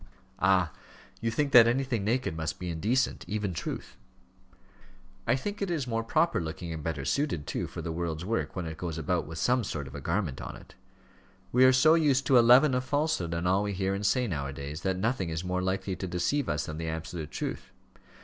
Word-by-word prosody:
"Ah, 95 -3 +3 0.5
you 115 - 0
think 140 +5 0
that 120 -2 +9
anything 120 -3 0
naked 115 -4 0
must 80 -1 -3
be 90 -1 -4
indecent; 110 +11 0
even 105 -3 -2
truth." - - -5 1.3
"I 120 - +4
think 205 +10 -4
it 200 - -1
is 160 -6 -1
more 115 -2 -1
proper 155 - +2
looking, 85 +1 -5
and 80 -2 -6
better 75 -4 -3
suited, 110 - 0
too, - - -3
for - - -7
the 85 - -3
world's 85 0 -3
work, 115 +3 -2
when 90 -3 -3
it 80 -1 -6
goes 85 -3 -4
about 80 -2 -1
with 80 +1 -7
some 125 +6 +2
sort 75 -8 -4
of 65 - -10
a 70 - -6
garment 85 -3 -2
on - - -6
it. - - -14 0.8
We 125 +1 +6
are 130 - +8
so 135 +5 +6
used 145 -5 +3
to 130 -3 +6
a - - +8
leaven 125 +4 +6
of 125 0 +1
falsehood 145 - 0
in 85 +1 -2
all 95 +2 +3
we 105 0 -2
hear 95 0 -1
and 100 +1 -3
say, 125 +5 +2
now 70 -10 -2
a 70 - -6
days, 70 +4 -6
that 95 0 0
nothing 105 -2 -1
is 80 +1 -3
more 90 0 -1
likely 95 +1 -1
to 95 - -4
deceive 90 +12 0
us 75 0 -1
than 75 +1 -6
the 80 - -3
absolute 80 0 -5
truth. - - -5
95 Hz, 225 wpm, -29 LUFS, 80-125 Hz, 1.3 s, that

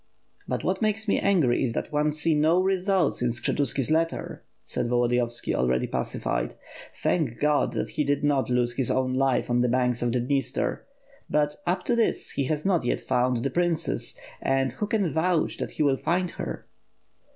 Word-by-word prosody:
"But - - -2
what - - -1
makes 215 0 0
me - - +2
angry 165 -12 +2
is 120 -3 0
that - - -4
one 150 0 +1
can 150 - +2
see 155 +2 +1
no 155 +4 +3
results 190 -3 +1
in 125 - +2
Skshetuski's 125 +3 0
letter," 165 +1 -1 0.2
said - - -2
Volodiyovski, 120 0 0
already 65 0 +1
pacified, - - -2 0.4
"thank 145 -10 0
Qod 150 0 +2
that - - -2
he 150 - -1
did 145 0 0
not 140 -3 +1
lose 125 -1 +1
his 125 -1 -1
own 130 -1 +1
life 135 -1 +1
on 120 0 +2
the 125 - +2
banks 125 -1 +1
of 120 -1 +1
the 125 - +1
Dniester. 135 +1 -1 0.5
But, 150 0 +1
up 180 +1 0
to 240 - +2
this, 230 -1 0
he 140 - -1
has 150 +4 -2
not 185 -6 +2
yet 120 - 0
found 125 -2 0
the 135 - -1
princess; 175 0 0 0.2
and 135 0 +1
who 210 - -3
can 210 -4 +1
vouch 160 +2 0
that - - -3
he - - -1
will 140 -2 +3
find 180 +4 0
her?" - - -6
145 Hz, 190 wpm, -26 LUFS, 125-170 Hz, 0.5 s, no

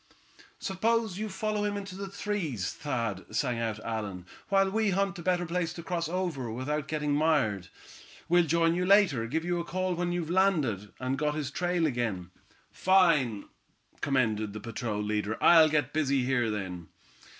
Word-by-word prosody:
"Suppose 220 0 0
you 215 0 -3
follow 210 +2 -2
him 205 0 -1
in 200 - -4
the 195 0 -7
trees, 190 - -3
Thad," 115 -9 -3
sang 120 +1 -1
out 115 -2 -2
Allan, 105 -5 -4 0.2
"while 195 -1 +3
we 220 0 +1
hunt 195 0 0
a - - -5
better 180 0 +1
place 170 0 -2
to 170 - -8
cross 170 -2 -2
over 170 -9 -2
without 140 +5 -3
getting 150 -2 -1
mired. 145 - +1 0.6
We'll 175 0 +4
join 165 +2 +3
you 180 +1 0
later. 180 - +4
Give 160 +7 -2
a 175 -1 -1
call 185 +2 -2
when 175 0 -1
you've 170 -2 -2
landed, 150 - +1
and 130 +1 -2
got 150 0 0
his 145 -3 -3
trail 175 +1 0
again." 115 - -2 0.4
"Fine," 165 - +3 0.6
commended 110 -7 0
the 110 - -6
patrol 105 -1 -3
leader. 105 0 -1
"I'll 160 -2 +7
get 150 -1 0
busy 140 -4 +1
here 125 -3 +1
then." 95 -5 -4
155 Hz, 165 wpm, -29 LUFS, 115-180 Hz, 0.6 s, I'll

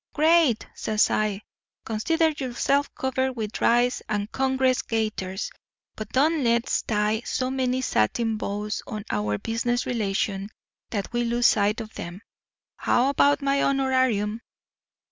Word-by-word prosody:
"'Great!' 310 -6 +4
says 215 -1 +1
I. 210 -1 0 0.4
'Consider 320 +10 +1
yourself 280 0 0
covered 265 0 -1
with 220 -3 -5
rice 240 +1 +3
and 210 0 -2
Congress 265 -1 +1
gaiters. 215 -4 -3 0.4
But 215 0 -6
don't 300 +4 +2
let's 235 0 +2
tie 215 0 0
so 255 +1 -2
many 260 -1 0
satin 225 - +1
bows 210 +1 -3
on 215 -1 -6
our 105 0 0
business 235 - -1
relations 200 -3 -1 0.4
that 205 +1 -4
we 240 0 +1
lose 240 +1 0
sight 210 +2 +3
of 220 0 -9
'em. 175 +5 -7 0.5
How 250 +3 +2
about 285 +1 +3
my 275 0 +2
honorarium? 260 -6 +1
235 Hz, 130 wpm, -25 LUFS, 210-265 Hz, 0.5 s, Great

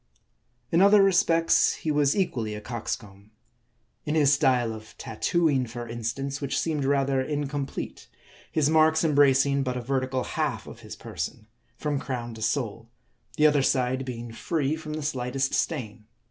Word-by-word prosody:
In 170 - +4
other 200 +1 +7
respects 165 -3 +3
he 155 - -3
was 145 -1 +2
equally 115 - -1
a - - -5
coxcomb. 105 -3 -6 0.7
In 150 - -2
his 145 -2 +5
style 125 -4 +2
of 110 0 -12
tattooing, 135 +3 0
for 120 +1 -7
instance, 120 +5 -4
which 135 -1 -1
seemed 150 -4 -1
rather 135 -1 +2
incomplete; 145 0 -4 0.4
his 155 -3 +2
marks 160 +1 +4
embracing 140 -2 +4
but 125 -2 -2
a - - -3
vertical 130 0 -1
half - - -2
of - - -11
his - - -9
person, 110 - -6 0.3
from 145 -2 -1
crown 120 -4 -4
to 110 - -10
sole; 115 -2 -2 0.5
the 150 - +4
other 150 -2 +5
side 130 0 +1
being 120 -2 -6
free 150 +3 -1
from 155 -1 -7
the 155 -1 -4
slightest 135 -1 -1
stain. 115 -8 -2
135 Hz, 155 wpm, -26 LUFS, 120-150 Hz, 0.7 s, other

